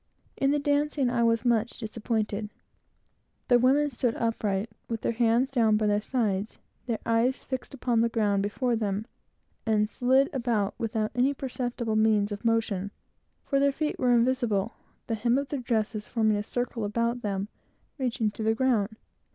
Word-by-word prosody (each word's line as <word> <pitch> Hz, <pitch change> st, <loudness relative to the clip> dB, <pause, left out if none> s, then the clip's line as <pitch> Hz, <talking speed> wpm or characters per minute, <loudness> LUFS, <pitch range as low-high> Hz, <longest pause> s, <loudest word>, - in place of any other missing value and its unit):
In 275 Hz, -, +1 dB
the 290 Hz, -, +3 dB
dancing, 285 Hz, -2 st, +1 dB
I 240 Hz, -1 st, +1 dB
was 230 Hz, +1 st, +2 dB
much 235 Hz, -1 st, +1 dB
disappointed. 215 Hz, -2 st, -2 dB, 1.0 s
The 245 Hz, -1 st, +6 dB
women 280 Hz, +4 st, +3 dB
stood 240 Hz, -1 st, -1 dB
upright, 220 Hz, -2 st, -1 dB, 0.2 s
with 230 Hz, -1 st, -3 dB
their -, -, 0 dB
hands 235 Hz, +3 st, +2 dB
down 225 Hz, -5 st, +3 dB
by 215 Hz, -, 0 dB
their 205 Hz, 0 st, +2 dB
sides, 215 Hz, -4 st, -1 dB, 0.3 s
their 230 Hz, -2 st, 0 dB
eyes 230 Hz, +3 st, +1 dB
fixed 260 Hz, +1 st, -5 dB
upon 240 Hz, -3 st, +1 dB
the 230 Hz, -, +2 dB
ground 210 Hz, -3 st, +1 dB
before 235 Hz, +4 st, 0 dB
them, 210 Hz, -1 st, -2 dB, 0.6 s
and 215 Hz, -2 st, +2 dB
slided 260 Hz, +5 st, +2 dB
about 235 Hz, -6 st, 0 dB
without 220 Hz, -1 st, -1 dB
any 260 Hz, +3 st, +2 dB
perceptible 245 Hz, -4 st, -3 dB
means 215 Hz, -1 st, +3 dB
of 205 Hz, +2 st, -5 dB
motion; 225 Hz, -4 st, 0 dB, 0.5 s
for 275 Hz, -, +1 dB
their 280 Hz, 0 st, +4 dB
feet 300 Hz, +2 st, -2 dB
were 250 Hz, -, +2 dB
invisible, 235 Hz, -3 st, +1 dB, 0.3 s
the 230 Hz, -, -3 dB
hem 235 Hz, +3 st, +2 dB
of 280 Hz, 0 st, -2 dB
their 285 Hz, -, -2 dB
dresses 220 Hz, -3 st, -2 dB
forming 220 Hz, -2 st, +2 dB
a -, -, 0 dB
perfect 205 Hz, -, -7 dB
circle 245 Hz, -2 st, -2 dB
about 235 Hz, +3 st, -1 dB
them, 200 Hz, -2 st, -2 dB, 0.5 s
reaching 235 Hz, -4 st, 0 dB
to 215 Hz, -, -8 dB
the 220 Hz, +1 st, +2 dB
ground. 225 Hz, -4 st, +1 dB
230 Hz, 170 wpm, -27 LUFS, 215-250 Hz, 1.0 s, The